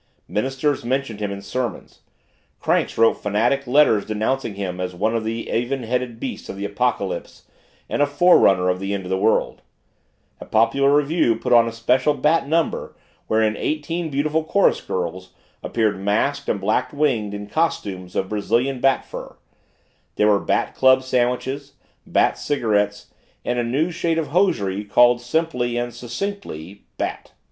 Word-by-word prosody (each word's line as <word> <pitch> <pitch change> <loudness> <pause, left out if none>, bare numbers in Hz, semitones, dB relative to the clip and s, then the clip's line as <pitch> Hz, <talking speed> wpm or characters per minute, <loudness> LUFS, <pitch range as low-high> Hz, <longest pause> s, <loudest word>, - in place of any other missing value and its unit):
Ministers 135 +5 -1
mentioned 125 -3 -2
him 105 -1 -2
in 100 0 -7
sermons; 120 0 -4 0.6
cranks - - 0
wrote 115 0 +3
fanatic 120 +7 0
letters 125 -5 +4
denouncing 110 +1 -2
him 95 -2 -4
as 90 -1 -4
one 110 +5 0
of 115 - -1
the 115 +1 -4
even 125 +2 -1
headed 120 0 -2
beasts 130 - -6
of - - -5
the 100 - -4
Apocalypse - - -2 0.4
and - - -1
a 145 - +4
forerunner 145 - +4
of 90 0 +1
the 100 +1 -2
end 95 - -4
of 90 - -7
the 95 - +1
world; 110 +3 +1 0.8
a - - -9
popular 140 +5 +3
revue 145 -4 +2
put 125 +2 -1
on 115 -1 +6
a - - -2
special 125 +5 +1
Bat 150 0 +2
number 165 +2 -1 0.3
wherein 110 -1 +2
eighteen 160 +6 -2
beautiful 155 +3 0
chorus 195 +5 +2
girls 90 +1 -4 0.3
appeared 110 -4 0
masked 115 +9 0
and 100 - 0
black 110 +6 0
winged 125 -9 0
in 105 0 -6
costumes 100 - -2
of 95 - 0
Brazilian 120 +5 0
bat 135 +1 +2
fur; - - -9 0.8
there 105 - +3
were 100 -1 +4
Bat - - -1
club 130 0 +4
sandwiches, 130 +2 -1 0.3
Bat - - +2
cigarettes, 105 -7 -1 0.3
and 120 0 0
a - - +1
new 140 +9 0
shade 165 -1 -1
of 160 - -2
hosiery 105 - +1
called 120 +4 +4
simply 125 -3 -1
and 120 0 -2
succinctly 120 - -6
Bat. - - -4
120 Hz, 160 wpm, -22 LUFS, 105-140 Hz, 0.8 s, on